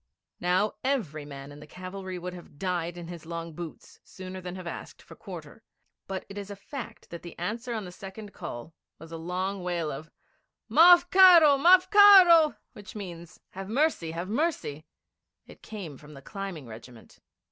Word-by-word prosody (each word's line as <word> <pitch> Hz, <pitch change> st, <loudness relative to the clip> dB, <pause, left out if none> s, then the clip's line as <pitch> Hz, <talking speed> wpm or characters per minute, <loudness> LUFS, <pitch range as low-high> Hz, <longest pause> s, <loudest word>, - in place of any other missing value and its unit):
Now, 185 Hz, +4 st, +1 dB
every 195 Hz, -, -2 dB
man 140 Hz, -1 st, -9 dB
in 145 Hz, -, -12 dB
the 150 Hz, -, -13 dB
cavalry 185 Hz, +2 st, -7 dB
would 180 Hz, +1 st, -6 dB
have 175 Hz, -5 st, -13 dB
died 175 Hz, 0 st, -3 dB
in 170 Hz, -1 st, -8 dB
his 170 Hz, -2 st, -9 dB
long 165 Hz, -1 st, -6 dB
boots 165 Hz, 0 st, -10 dB
sooner 185 Hz, 0 st, -9 dB
than 180 Hz, 0 st, -7 dB
have 185 Hz, -1 st, -8 dB
asked 170 Hz, -, -8 dB
for -, -, -14 dB
quarter; -, -, -10 dB, 0.5 s
but 190 Hz, -1 st, -5 dB
it 200 Hz, +1 st, -8 dB
is 200 Hz, 0 st, -8 dB
a 200 Hz, -, -6 dB
fact 255 Hz, +6 st, -9 dB
that 170 Hz, -, -7 dB
the 170 Hz, -, -11 dB
answer 230 Hz, +8 st, -4 dB
to 215 Hz, -, -5 dB
the 180 Hz, -, -9 dB
second 195 Hz, +3 st, -10 dB
call 120 Hz, +7 st, -8 dB, 0.2 s
was 160 Hz, +1 st, -13 dB
a 165 Hz, -, -6 dB
long 185 Hz, +4 st, -3 dB
wail 175 Hz, -3 st, -2 dB
of 155 Hz, +4 st, -8 dB, 0.6 s
'Marf 350 Hz, +2 st, +7 dB
karo! 350 Hz, -6 st, +8 dB
Marf 365 Hz, +4 st, +6 dB
karo!' 375 Hz, -7 st, +8 dB, 0.2 s
which 210 Hz, +1 st, -12 dB
means, 175 Hz, -5 st, -9 dB
'Have 195 Hz, +1 st, -8 dB
mercy! 265 Hz, -, +1 dB
Have 170 Hz, +3 st, -5 dB
mercy!' 215 Hz, -, -2 dB, 0.6 s
It -, -, -16 dB
came 185 Hz, -11 st, -8 dB
from 150 Hz, 0 st, -14 dB
the 135 Hz, -, -13 dB
climbing 195 Hz, -5 st, -7 dB
regiment. 115 Hz, +1 st, -13 dB
185 Hz, 180 wpm, -27 LUFS, 165-220 Hz, 0.6 s, karo